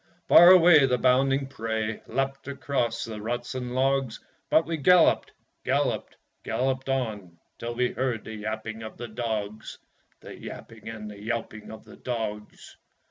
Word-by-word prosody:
Far 175 Hz, +1 st, +9 dB
away 170 Hz, -6 st, +7 dB
the 125 Hz, -1 st, +1 dB
bounding 135 Hz, +2 st, +2 dB
prey 110 Hz, -4 st, -3 dB
Leapt 135 Hz, +2 st, -3 dB
across 135 Hz, -4 st, -2 dB
the 110 Hz, -2 st, -7 dB
ruts 120 Hz, +3 st, -4 dB
and 125 Hz, -1 st, -5 dB
logs, 135 Hz, -2 st, 0 dB, 0.3 s
But 160 Hz, -, +4 dB
we 165 Hz, 0 st, -3 dB
galloped, 175 Hz, +4 st, +4 dB, 0.3 s
galloped, -, -, -1 dB, 0.3 s
galloped 130 Hz, +3 st, -2 dB
on, 105 Hz, -10 st, -3 dB, 0.2 s
Till 120 Hz, 0 st, -5 dB
we 125 Hz, 0 st, +1 dB
heard 125 Hz, -3 st, -2 dB
the 110 Hz, -, -8 dB
yapping 110 Hz, +1 st, -5 dB
of 110 Hz, -, -9 dB
the 120 Hz, -, -6 dB
dogs 110 Hz, -2 st, -4 dB, 0.4 s
The -, -, -10 dB
yapping -, -, -10 dB
and 110 Hz, -1 st, -7 dB
the 100 Hz, -1 st, -12 dB
yelping 110 Hz, -1 st, -5 dB
of 110 Hz, -1 st, -10 dB
the -, -, -14 dB
dogs. 110 Hz, -4 st, -6 dB
120 Hz, 150 wpm, -26 LUFS, 110-135 Hz, 0.4 s, Far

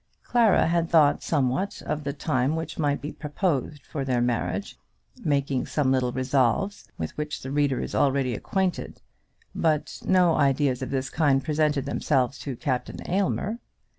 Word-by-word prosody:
Clara 230 Hz, -4 st, +4 dB
had 170 Hz, 0 st, +1 dB
thought 150 Hz, -3 st, +4 dB
somewhat 145 Hz, +5 st, 0 dB
of 150 Hz, -1 st, -3 dB
the 140 Hz, -, -1 dB
time 135 Hz, 0 st, 0 dB
which 160 Hz, +1 st, -5 dB
might 145 Hz, -2 st, +1 dB
be 150 Hz, -, -5 dB
proposed 150 Hz, -2 st, -2 dB
for 140 Hz, -, -4 dB
their 130 Hz, -2 st, 0 dB
marriage, 120 Hz, -1 st, -1 dB, 0.5 s
making 140 Hz, -3 st, 0 dB
some 140 Hz, -4 st, +1 dB
little 130 Hz, -2 st, +1 dB
resolves, 130 Hz, -, 0 dB
with 80 Hz, -1 st, -4 dB
which 150 Hz, 0 st, -4 dB
the 130 Hz, -, -5 dB
reader 145 Hz, -2 st, +1 dB
is -, -, -4 dB
already 135 Hz, -3 st, +2 dB
acquainted; 190 Hz, -, -2 dB, 0.5 s
but 155 Hz, -2 st, 0 dB
no 180 Hz, -3 st, +4 dB
ideas 140 Hz, -3 st, +2 dB
of 130 Hz, -, -3 dB
this 135 Hz, -1 st, -2 dB
kind 140 Hz, -4 st, +2 dB
presented 150 Hz, -2 st, +1 dB
themselves 135 Hz, -2 st, 0 dB
to 135 Hz, +1 st, -5 dB
Captain 125 Hz, 0 st, -2 dB
Aylmer. 200 Hz, +4 st, 0 dB
145 Hz, 155 wpm, -26 LUFS, 130-160 Hz, 0.5 s, Clara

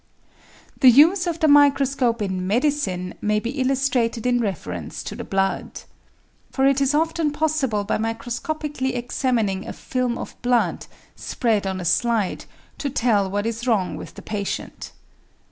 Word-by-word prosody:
The 260 Hz, -, +8 dB
use 335 Hz, +9 st, +5 dB
of 335 Hz, -1 st, -2 dB
the 315 Hz, -, +4 dB
microscope 275 Hz, -5 st, +4 dB
in 185 Hz, -2 st, -3 dB
medicine 220 Hz, -6 st, 0 dB
may 210 Hz, 0 st, +1 dB
be 235 Hz, +2 st, -4 dB
illustrated 255 Hz, -3 st, 0 dB
in 245 Hz, -1 st, +2 dB
reference 90 Hz, -, -4 dB
to -, -, -6 dB
the -, -, -6 dB
blood. 195 Hz, 0 st, -2 dB, 0.7 s
For 265 Hz, -, 0 dB
it 275 Hz, 0 st, +3 dB
is 275 Hz, +1 st, +2 dB
often 320 Hz, 0 st, +1 dB
possible 290 Hz, -8 st, 0 dB
by 205 Hz, -, -1 dB
microscopically 260 Hz, +5 st, -3 dB
examining 235 Hz, -5 st, -1 dB
a -, -, -5 dB
film 250 Hz, -2 st, -2 dB
of -, -, -7 dB
blood, 245 Hz, -1 st, +1 dB, 0.3 s
spread 220 Hz, -5 st, -1 dB
on 190 Hz, -1 st, -3 dB
a 180 Hz, -, -5 dB
slide, 215 Hz, +3 st, +1 dB, 0.3 s
to 285 Hz, -, -2 dB
tell 225 Hz, -7 st, +1 dB
what 205 Hz, +2 st, -2 dB
is 230 Hz, +2 st, -3 dB
wrong 210 Hz, -6 st, +1 dB
with -, -, -9 dB
the -, -, -10 dB
patient. 205 Hz, -2 st, -5 dB
240 Hz, 150 wpm, -22 LUFS, 205-275 Hz, 0.7 s, The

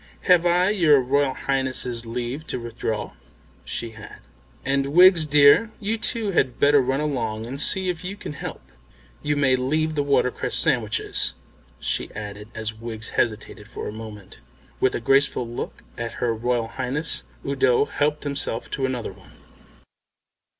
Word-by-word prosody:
Have 180 Hz, -1 st, +4 dB
I 180 Hz, +3 st, +3 dB
your 160 Hz, -9 st, +5 dB
Royal 135 Hz, +1 st, +1 dB
Highness's 130 Hz, -3 st, 0 dB
leave 125 Hz, +6 st, -4 dB
to -, -, -3 dB
withdraw?" 115 Hz, -2 st, -4 dB, 0.5 s
She 115 Hz, -1 st, -4 dB
had. 110 Hz, -2 st, -11 dB, 0.5 s
"And, 140 Hz, +1 st, 0 dB
Wiggs, 180 Hz, -2 st, +7 dB
dear, 145 Hz, +8 st, +6 dB
you 215 Hz, +2 st, -2 dB
too 225 Hz, -2 st, -2 dB
had 130 Hz, -8 st, +1 dB
better 145 Hz, 0 st, +5 dB
run 130 Hz, +2 st, 0 dB
along 115 Hz, -7 st, -2 dB
and 135 Hz, +4 st, -5 dB
see 190 Hz, +3 st, +1 dB
if 180 Hz, -1 st, -3 dB
you 190 Hz, +2 st, -5 dB
can 205 Hz, -, -7 dB
help. 140 Hz, -, -7 dB, 0.6 s
You 150 Hz, 0 st, 0 dB
may 140 Hz, -3 st, +3 dB
leave 155 Hz, +5 st, 0 dB
the 150 Hz, -, 0 dB
watercress 140 Hz, -3 st, +1 dB
sandwiches," 120 Hz, -9 st, +1 dB, 0.4 s
she -, -, -2 dB
added, 105 Hz, 0 st, -7 dB
as 110 Hz, -1 st, -4 dB
Wiggs 115 Hz, 0 st, -4 dB
hesitated 110 Hz, -3 st, -2 dB
for -, -, -6 dB
a -, -, -5 dB
moment. 110 Hz, -3 st, -10 dB, 0.4 s
With 130 Hz, -, +2 dB
a -, -, -1 dB
grateful 135 Hz, 0 st, +2 dB
look 120 Hz, -, -6 dB, 0.2 s
at 115 Hz, -1 st, -4 dB
her 120 Hz, -2 st, -1 dB
Royal 120 Hz, 0 st, -1 dB
Highness 135 Hz, +6 st, -1 dB, 0.2 s
Udo 135 Hz, -1 st, +3 dB
helped 150 Hz, +1 st, -1 dB
himself 140 Hz, -5 st, -2 dB
to 135 Hz, -2 st, -1 dB
another 125 Hz, -6 st, -4 dB
one. 95 Hz, -1 st, -19 dB
130 Hz, 155 wpm, -24 LUFS, 115-150 Hz, 0.6 s, Wiggs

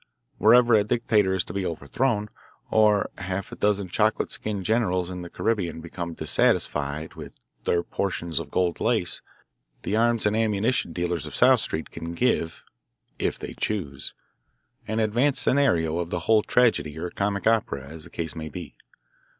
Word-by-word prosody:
Whenever 120 Hz, +2 st, +6 dB
a 105 Hz, -2 st, +6 dB
dictator 105 Hz, -3 st, +2 dB
is 95 Hz, -1 st, +1 dB
to -, -, -9 dB
be 100 Hz, 0 st, -1 dB
overthrown, 105 Hz, -, -1 dB, 0.4 s
or 105 Hz, -2 st, +4 dB
half 95 Hz, +1 st, -4 dB
a -, -, -6 dB
dozen 100 Hz, -2 st, +1 dB
chocolate 110 Hz, +4 st, +1 dB
skinned 100 Hz, -3 st, -3 dB
generals 95 Hz, -6 st, +1 dB
in 90 Hz, -1 st, -5 dB
the 85 Hz, -, -7 dB
Caribbean 100 Hz, -7 st, -1 dB
become 85 Hz, 0 st, -6 dB
dissatisfied 75 Hz, +2 st, 0 dB
with -, -, -9 dB, 0.3 s
their 85 Hz, 0 st, +2 dB
portions 85 Hz, -4 st, -2 dB
of 80 Hz, -3 st, -7 dB
gold 90 Hz, +2 st, 0 dB
lace, 110 Hz, -6 st, +1 dB, 0.6 s
the 105 Hz, -, -1 dB
arms 115 Hz, 0 st, +2 dB
and 105 Hz, +1 st, +2 dB
ammunition 110 Hz, -2 st, +1 dB
dealers 85 Hz, -2 st, -2 dB
of -, -, -8 dB
South -, -, +6 dB
Street 80 Hz, -, -4 dB
can 85 Hz, +1 st, -6 dB
give, 85 Hz, -6 st, 0 dB, 0.6 s
if -, -, -1 dB
they -, -, -7 dB
choose, 85 Hz, -11 st, -3 dB, 0.7 s
an 110 Hz, +1 st, -1 dB
advance 120 Hz, +6 st, +2 dB
scenario 85 Hz, -, +2 dB
of 85 Hz, -1 st, -3 dB
the 90 Hz, -, -2 dB
whole 110 Hz, +4 st, +4 dB
tragedy 105 Hz, -12 st, +2 dB
or 85 Hz, +2 st, -4 dB
comic 100 Hz, 0 st, -1 dB
opera, 105 Hz, -12 st, +1 dB
as 80 Hz, +2 st, -9 dB
the -, -, -12 dB
case 80 Hz, -1 st, -5 dB
may 80 Hz, -1 st, -5 dB
be. 85 Hz, -3 st, -8 dB
95 Hz, 165 wpm, -25 LUFS, 85-110 Hz, 0.7 s, Whenever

